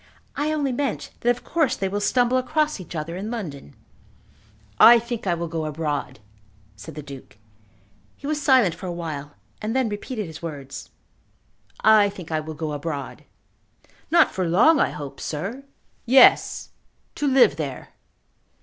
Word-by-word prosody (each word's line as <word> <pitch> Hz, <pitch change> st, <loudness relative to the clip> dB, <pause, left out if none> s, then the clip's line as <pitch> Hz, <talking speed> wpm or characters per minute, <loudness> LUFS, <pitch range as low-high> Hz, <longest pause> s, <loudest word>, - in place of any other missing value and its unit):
"I 295 Hz, +2 st, -1 dB
only 290 Hz, -3 st, 0 dB
meant 275 Hz, +2 st, -3 dB
that 240 Hz, -, 0 dB
of 245 Hz, 0 st, 0 dB
course 320 Hz, -5 st, +1 dB
they 195 Hz, -, -2 dB
will 200 Hz, +2 st, -2 dB
stumble 245 Hz, +3 st, +2 dB
across 305 Hz, +1 st, 0 dB
each 180 Hz, -1 st, -9 dB
other 160 Hz, +2 st, -4 dB
in 200 Hz, +4 st, -5 dB
London." 155 Hz, -, -7 dB, 1.0 s
"I 240 Hz, +1 st, +9 dB
think 235 Hz, -2 st, -5 dB
I 175 Hz, -, +2 dB
will 170 Hz, 0 st, -4 dB
go 160 Hz, -1 st, -3 dB
abroad," 150 Hz, -4 st, -3 dB, 0.6 s
said 105 Hz, +6 st, -11 dB
the 150 Hz, -, -7 dB
Duke. 140 Hz, -6 st, -12 dB, 0.8 s
He -, -, -12 dB
was 300 Hz, 0 st, -1 dB
silent 260 Hz, -, +4 dB
for 180 Hz, +3 st, -8 dB
awhile, 155 Hz, -5 st, -6 dB, 0.3 s
and 220 Hz, +3 st, -3 dB
then 260 Hz, -3 st, +1 dB
repeated 210 Hz, +1 st, -5 dB
his 160 Hz, -2 st, -10 dB
words. 145 Hz, -5 st, -7 dB, 0.9 s
"I 215 Hz, -2 st, +6 dB
think 180 Hz, -4 st, -10 dB
I 155 Hz, -, +1 dB
will 155 Hz, 0 st, -7 dB
go 155 Hz, 0 st, -4 dB
abroad." 145 Hz, -2 st, -5 dB, 0.8 s
"Not -, -, +5 dB
for 185 Hz, -2 st, -2 dB
long, 275 Hz, -, +5 dB
I -, -, +3 dB
hope, 145 Hz, -2 st, -8 dB
sir." 200 Hz, -, -5 dB, 0.4 s
"Yes; 260 Hz, +2 st, +5 dB, 0.4 s
to 295 Hz, -, -2 dB
live 260 Hz, -, +5 dB
there. 140 Hz, -5 st, -5 dB
190 Hz, 160 wpm, -23 LUFS, 155-250 Hz, 1.0 s, I